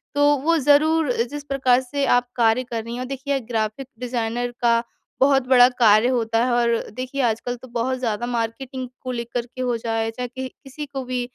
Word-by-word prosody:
तो 290 0 +4 0.2
वो 330 +1 +3
ज़रूर 295 +1 +3 0.2
जिस 290 -1 -6
प्रकार 260 -3 +2
से 280 +2 -2
आप 245 - -1
कार्य 230 +1 +3
कर 230 -3 -4
रही 230 +1 -7
हैं 245 - -4
और 255 - -4
देखिए 275 +1 -2
ग्राफ़िक 220 +3 -2
डिज़ाइनर 240 -1 -2
का 235 -1 +4 0.4
बहुत 270 -2 +4
बड़ा 250 -1 +7
कार्य 215 +1 +6
होता 230 -2 +1
है 255 - 0
और 240 -1 +2 0.3
देखिए 255 +2 -3
आजकल 245 +3 -3
तो 255 +2 -13
बहुत 245 +2 -1
ज़्यादा 230 -2 -2
मार्केटिंग 245 +2 -3
को 255 - -4
लेकर 235 0 -3
के 255 +1 -9
हो 245 -1 0
जाए, 225 0 -1
चाहे 250 +2 -5
किह 260 +2 -6
किसी 285 +3 -9
को 270 -2 -6
भी 250 0 -2
250 Hz, 200 wpm, -22 LUFS, 235-265 Hz, 0.4 s, बड़ा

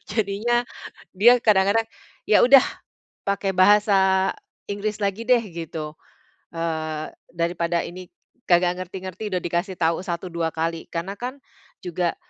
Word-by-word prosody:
Jadinya 220 +3 0 0.5
dia 240 +6 +7
kadang-kadang, 210 +1 +3 0.4
"Ya 210 - +6
udah 265 +1 +8 0.6
pakai 200 0 0
bahasa 190 -1 +4 0.4
Inggris 210 +1 -3
lagi 200 +3 -1
deh," 250 -1 +5
gitu, 160 -2 -6 0.6
eee, 160 -2 -3 0.2
"daripada 170 0 0
ini 180 +1 -9 0.4
kagak 175 0 +3
ngerti-ngerti 185 +2 -6
udah 180 -1 -1
dikasih 175 +3 -2
tau 165 0 +1
1 175 0 -4
2 165 -1 -1
kali," 165 0 -2
karena 175 +4 -4
kan 255 +3 -5 0.4
juga, 175 -1 -1
185 Hz, 120 wpm, -23 LUFS, 170-205 Hz, 0.6 s, udah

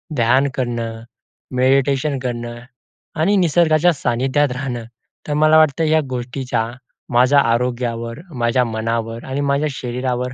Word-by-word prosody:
ध्यान 130 +3 +3
करणं, 115 -3 -3 0.5
मेडिटेशन 135 +2 +2
करणं 120 -2 -5 0.6
आणि 195 +6 +3
निसर्गाच्या 170 -1 +3
सानिध्यात 135 +2 0
राहणं. 125 -3 -4 0.4
तर 150 - -1
मला 155 +1 +5
वाटतं 155 0 +3
या 155 0 +3
गोष्टीचा 125 -2 -3 0.4
माझ्या 130 +4 +5
आरोग्यावर, 120 -1 -1 0.2
माझ्या 120 +1 +2
मनावर 115 0 -3
आणि 135 +2 -3
माझ्या 140 +2 +1
शरीरावर 125 -1 -3
125 Hz, 115 wpm, -19 LUFS, 120-145 Hz, 0.6 s, मला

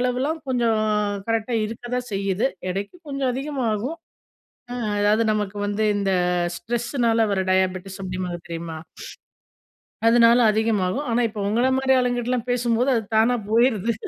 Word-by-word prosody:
அளவெல்லாம் 255 +6 -1
கொஞ்சம், 235 -4 +1 0.5
கரெக்ட்டா 225 +1 0
இருக்க 225 +2 -9
தான் 250 -1 -4
செய்யுது, 195 +5 0 0.2
எடைக்கு 200 - -4
கொஞ்சம் 275 -2 -1
அதிகமாகும். 265 -1 -2 0.8
ம், 240 -3 -3
அதாவது 210 +2 +3
நமக்கு 210 -1 -2
வந்து 205 +1 -1
இந்த 195 -1 0 0.4
ஸ்ட்ரெஸ்ஸுனால 235 -1 0
வர 190 - +1
டயாபெட்டிஸ், 190 +1 -1
அப்படிம்பாங்க 180 -2 -4
தெரியுமா? 165 -1 -5 1.3
அதனால 235 0 +6
அதிகமாகும், 220 +3 0
ஆனா 240 +1 +2
இப்போ 210 -1 -6
உங்கள 240 +4 +2
மாரி 265 0 +3
ஆளுங்ககிட்டலாம் 245 0 -1
பேசும்போது 245 +1 +1
அது 225 - 0
தானா 240 +2 +4
போயிருது! 230 -2 +3
230 Hz, 130 wpm, -23 LUFS, 205-245 Hz, 1.3 s, அதனால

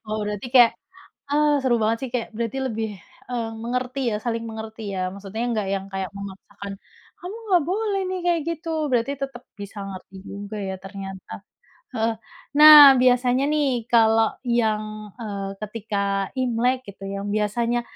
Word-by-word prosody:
Oh, 215 0 -2
berarti 210 +2 -4
kayak, 240 -2 +8 0.6
"Ah, 295 0 +3
seru 245 -3 +3
banget 225 +1 +1
sih," - - -10
kayak 235 - -1
berarti 235 +3 -2
lebih, 225 -2 -2 0.4
eee, 235 -2 -2
mengerti 250 +2 -2
ya, - - 0
saling 230 0 -3
mengerti 220 0 -7
ya, 185 -1 -2
maksudnya 200 +3 -7
nggak 215 -3 -1
yang 195 0 -4
kayak 190 -1 -3
memaksakan, 200 0 -9 0.5
"Kamu 365 +5 -7
nggak 355 -4 +4
boleh 400 +3 -1
nih, 370 -1 -3
kayak 340 -2 +2
gitu!" 330 0 -4 0.2
berarti 245 +3 +1
tetap 270 -3 -6
bisa 205 0 -9
ngerti 190 0 -10
juga 205 +1 -7
ya, 190 -1 -4
ternyata. 195 0 -9 0.6
Heeh, 225 -2 0 0.4
nah 295 -2 +11
biasanya 250 +1 +3
nih, 265 -6 0
kalau 225 -2 +4 0.2
yang, 220 -3 +1 0.3
eee, 200 -4 -5
ketika 200 -2 -2
imlek 250 0 +1
gitu, 195 0 -11
yang 200 +1 -4
biasanya, 230 +3 0
225 Hz, 155 wpm, -23 LUFS, 200-255 Hz, 0.6 s, nah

